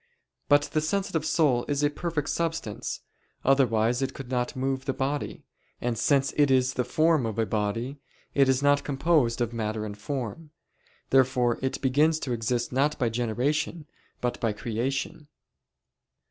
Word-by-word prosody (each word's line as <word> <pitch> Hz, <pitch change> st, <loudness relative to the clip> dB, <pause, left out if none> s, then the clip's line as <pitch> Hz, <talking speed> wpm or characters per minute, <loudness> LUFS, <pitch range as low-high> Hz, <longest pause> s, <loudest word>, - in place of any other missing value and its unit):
But 145 Hz, -1 st, +6 dB
the 155 Hz, -, +2 dB
sensitive 190 Hz, 0 st, -1 dB
soul 135 Hz, -7 st, +3 dB
is 145 Hz, 0 st, 0 dB
a 145 Hz, -, +3 dB
perfect 160 Hz, -2 st, -3 dB
substance, 165 Hz, -10 st, -3 dB, 0.4 s
otherwise 120 Hz, -3 st, +3 dB
it 135 Hz, -, -2 dB
could 135 Hz, -2 st, -8 dB
not 125 Hz, +3 st, -1 dB
move 135 Hz, 0 st, -2 dB
the 135 Hz, -, -1 dB
body; 140 Hz, +2 st, -2 dB, 0.4 s
and 120 Hz, -1 st, -1 dB
since 135 Hz, +4 st, +2 dB
it 145 Hz, -1 st, +4 dB
is 130 Hz, 0 st, +3 dB
the 125 Hz, -, 0 dB
form 155 Hz, +3 st, +2 dB
of 110 Hz, -, -4 dB
a 115 Hz, -, +2 dB
body, 115 Hz, +6 st, -2 dB, 0.3 s
it 135 Hz, -1 st, +4 dB
is 130 Hz, +1 st, +2 dB
not 145 Hz, 0 st, +4 dB
composed 135 Hz, -4 st, +1 dB
of 120 Hz, -1 st, -1 dB
matter 110 Hz, -1 st, -2 dB
and 105 Hz, -1 st, -6 dB
form. 130 Hz, +6 st, -5 dB, 0.6 s
Therefore 125 Hz, -2 st, +3 dB
it 130 Hz, 0 st, -2 dB
begins 150 Hz, +4 st, +3 dB
to 130 Hz, -, -3 dB
exist 120 Hz, +1 st, -1 dB
not 140 Hz, +4 st, +1 dB
by 120 Hz, -3 st, +1 dB
generation 125 Hz, +8 st, -1 dB, 0.4 s
but 125 Hz, 0 st, -1 dB
by 115 Hz, -2 st, 0 dB
creation. 130 Hz, +7 st, -3 dB
130 Hz, 160 wpm, -27 LUFS, 120-145 Hz, 0.6 s, But